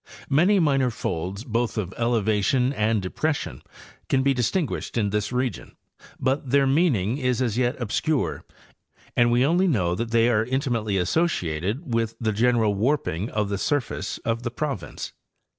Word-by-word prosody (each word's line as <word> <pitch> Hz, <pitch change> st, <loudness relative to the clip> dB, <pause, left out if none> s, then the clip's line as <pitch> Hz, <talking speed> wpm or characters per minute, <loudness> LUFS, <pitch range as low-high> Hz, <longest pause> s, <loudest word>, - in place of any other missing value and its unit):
Many 175 Hz, +9 st, +4 dB
minor 135 Hz, -6 st, +3 dB
folds 95 Hz, -1 st, -4 dB
both 120 Hz, -1 st, -1 dB
of 95 Hz, -3 st, -3 dB
elevation 115 Hz, +3 st, +1 dB
and 110 Hz, -4 st, +1 dB
depression 145 Hz, +10 st, -2 dB, 0.5 s
can 130 Hz, -1 st, +2 dB
be 140 Hz, 0 st, +3 dB
distinguished 130 Hz, -, -1 dB
in 105 Hz, -3 st, +1 dB
this 105 Hz, +1 st, -1 dB
region, 125 Hz, 0 st, -3 dB, 0.4 s
but 135 Hz, +1 st, 0 dB
their 140 Hz, +1 st, +4 dB
mean 150 Hz, +2 st, +3 dB
ing 105 Hz, +6 st, -1 dB
is 125 Hz, -3 st, 0 dB
as 120 Hz, -5 st, 0 dB
yet 125 Hz, +1 st, 0 dB
obscure 130 Hz, +6 st, -1 dB, 0.7 s
and 120 Hz, 0 st, +4 dB
we 120 Hz, +2 st, +4 dB
only 175 Hz, +6 st, +3 dB
know 95 Hz, -, +1 dB
that 115 Hz, +5 st, -3 dB
they 115 Hz, 0 st, +3 dB
are 110 Hz, -3 st, +3 dB
intimately 120 Hz, -5 st, -1 dB
associated 105 Hz, -, -1 dB
with 115 Hz, -1 st, 0 dB
the 110 Hz, -2 st, 0 dB
general 115 Hz, -1 st, +2 dB
warping 105 Hz, -, 0 dB
of 105 Hz, -1 st, -1 dB
the 100 Hz, -1 st, -2 dB
surface 145 Hz, +1 st, -1 dB
of 115 Hz, 0 st, 0 dB
the 120 Hz, -, -2 dB
proy 130 Hz, -, -3 dB
ince. -, -, -7 dB
120 Hz, 160 wpm, -24 LUFS, 105-135 Hz, 0.7 s, Many